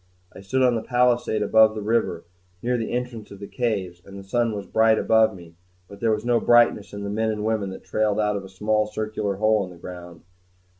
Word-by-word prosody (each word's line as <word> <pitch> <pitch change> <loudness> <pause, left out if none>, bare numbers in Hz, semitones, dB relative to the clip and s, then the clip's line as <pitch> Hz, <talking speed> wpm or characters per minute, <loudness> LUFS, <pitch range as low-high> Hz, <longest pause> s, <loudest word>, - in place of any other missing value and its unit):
I - - -11
stood 130 +7 0
on 125 -1 +4
the 115 - -1
palisade 120 -3 +1
above 110 +1 +4
the 105 - -4
river, 110 -6 -1 0.4
near 125 +1 0
the 115 -2 -3
entrance 120 -3 -4
of 100 - -12
the 100 - -7
caves; 100 -7 -3
and 100 0 -12
the 100 - -9
sun 115 +2 0
was 100 -1 -6
bright 110 +2 +3
above 110 -1 +3
me; 85 -2 -13 0.3
but 100 - -13
there 115 - +1
was 110 +1 -1
no 120 -1 +3
brightness 120 -3 +3
in 100 0 -7
the 100 - -4
men 110 +1 0
and 105 -1 -3
women 110 -3 -1
that 95 - -9
trailed 110 -1 0
out 105 -1 +1
of 100 - -4
a 95 - -11
small 105 +2 0
circular 105 -2 -3
hole 110 +1 +2
in 95 - -7
the 90 - -13
ground. 85 -1 -10
110 Hz, 235 wpm, -23 LUFS, 100-115 Hz, 0.4 s, on